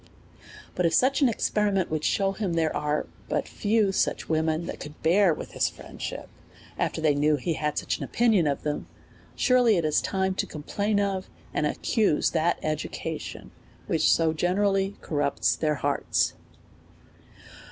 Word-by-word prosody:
But 180 -2 +1
if 165 - +1
such 270 +3 +3
an 270 - +5
experiment 205 -5 0
would 155 -1 -1
shew 195 +3 +1
him 195 -3 -2
that 165 - +1
there 160 -1 0
are 150 0 -1 0.2
but - - -1
few 210 -1 +1
such - - 0
women 160 +1 0
that - - -6
could 150 +1 -9
bear 180 +3 +5
with 155 - -5
his - - +1
friendship, - - -7 0.5
after - - -1
they 155 -2 +3
knew 150 +1 +3
he 155 +4 -2
had 150 -1 -2
such - - -1
an - - -4
opini 230 -4 +3
on 165 - +2
of 140 - -1
them, 150 -1 -3 0.5
surely 250 -5 +4
it 170 - 0
is 155 -1 +2
time 190 -1 0
to - - -2
complain 200 +7 -1
of, 195 -2 -1 0.2
and - - +1
ac - - -3
cuse 210 -10 +2
that 165 +1 +1
education, 155 -1 -4 0.3
which 160 -1 +2
so 160 -1 +3
generally 195 +3 +1
corrupts 145 -2 0
their 155 -1 0
hearts. 140 +1 0
170 Hz, 170 wpm, -26 LUFS, 155-200 Hz, 0.5 s, an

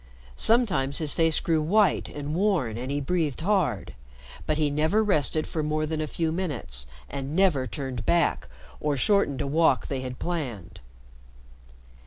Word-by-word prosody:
Sometimes 185 - +2
his 155 -3 0
face 165 -2 +3
grew 160 -2 +1
white 195 +3 +2
and 145 0 -5
worn 170 - +1
and 125 +3 -5
he 145 +1 -1
breathed 155 -1 -1
hard, 165 - 0 0.5
but 155 - +1
he 150 -2 +1
never 160 +9 +2
rested 155 -5 +1
more 155 0 0
than 155 0 -2
a 155 - -2
few 160 +1 -1
minutes, 130 - -3 0.2
and 140 +2 -5
never 170 -9 +3
turned 130 -1 -5
back 170 - +1 0.3
or 150 -2 -1
shortened 150 - +2
a - - -2
walk 145 -4 +2
they 135 -2 -2
had 125 -1 -6
planned. 125 - -5
150 Hz, 155 wpm, -26 LUFS, 135-170 Hz, 0.5 s, face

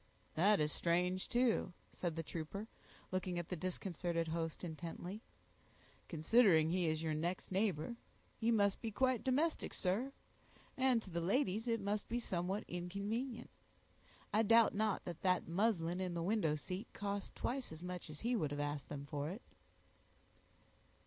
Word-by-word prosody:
"That 200 +6 +5
is 150 0 +2
strange, 180 +3 +1
too," 240 -6 +2 0.2
said 175 -3 -2
the 165 - -2
trooper, 170 +7 -5 0.4
looking 185 -1 -1
at 175 -1 -3
the 180 - -1
disconcerted 175 -1 -2
host 165 0 -2
intently, 175 +4 -5 0.9
"considering 165 -1 +5
he 180 -1 +2
is 155 0 0
your 160 -1 0
next 170 +5 -2
neighbor; 195 +2 0 0.4
he 225 - 0
must 200 -4 +3
be 230 - -2
quite 255 +2 +2
domestic, 290 +5 +1
sir; 210 +9 0 0.6
and 260 -4 +3
to 190 - -10
the 170 0 -1
ladies 215 +3 +1
it 230 -1 +2
must 205 +1 -2
be 240 - 0
somewhat 190 -2 -1
inconvenient. 200 +8 -3 0.8
I 215 - +5
doubt 230 +1 +6
not 215 0 0
that 170 -2 -6
that 185 -1 +2
muslin 175 -1 +1
in 180 -2 -2
the 170 - -1
window 180 -5 +2
seat 185 +8 -5
cost 200 -1 -3
twice 255 -3 -2
as 160 +2 -8
much 180 -2 -5
as 150 - -8
he 240 +2 +1
would 155 -10 +1
have 145 0 -3
asked 145 -1 -2
them 140 -1 -5
for 145 0 -3
it." 200 +7 -7
185 Hz, 160 wpm, -38 LUFS, 165-220 Hz, 0.9 s, doubt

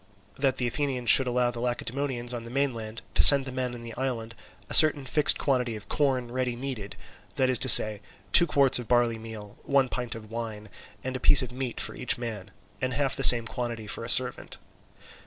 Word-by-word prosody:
That 135 -1 -2
the 125 - -3
Athenians 125 -2 -1
should 135 - +5
allow 125 0 -1
the 120 - -9
Lacedaemonians 125 +1 -4
on 120 - -6
the 115 - -12
mainland 115 -5 -5
to - - +2
send 140 -2 +7
to 130 - -7
the - - -12
men 125 -1 -5
in 120 - -12
the 115 -1 -10
island 120 -3 -6 0.3
a - - -9
certain 150 -3 +5
fixed 150 +3 +2
quantity 125 -4 -3
of 105 -2 -13
corn 130 -5 -2
ready 125 -1 -4
kneaded, 120 -6 -8 0.4
that 130 -1 0
is 125 - +2
to 130 - 0
say, 110 -3 +7 0.3
two 170 - +5
quarts 140 -4 +2
of 120 - -10
barley 120 -2 0
meal, 110 -2 -12
one 135 -2 -1
pint 125 -2 -6
of 110 -1 -13
wine, 110 -2 -8 0.3
and 130 0 -6
a - - -5
piece 140 - +3
of 125 - -9
meat 125 -1 -7
for - - -4
each 125 - -2
man, 115 -5 -8 0.3
and 130 -1 -4
half 140 -2 -2
the 135 - -5
same 120 -3 +8
quantity 120 -2 -7
for 105 - -6
a - - -6
servant. 125 0 +2
125 Hz, 215 wpm, -25 LUFS, 115-130 Hz, 0.4 s, same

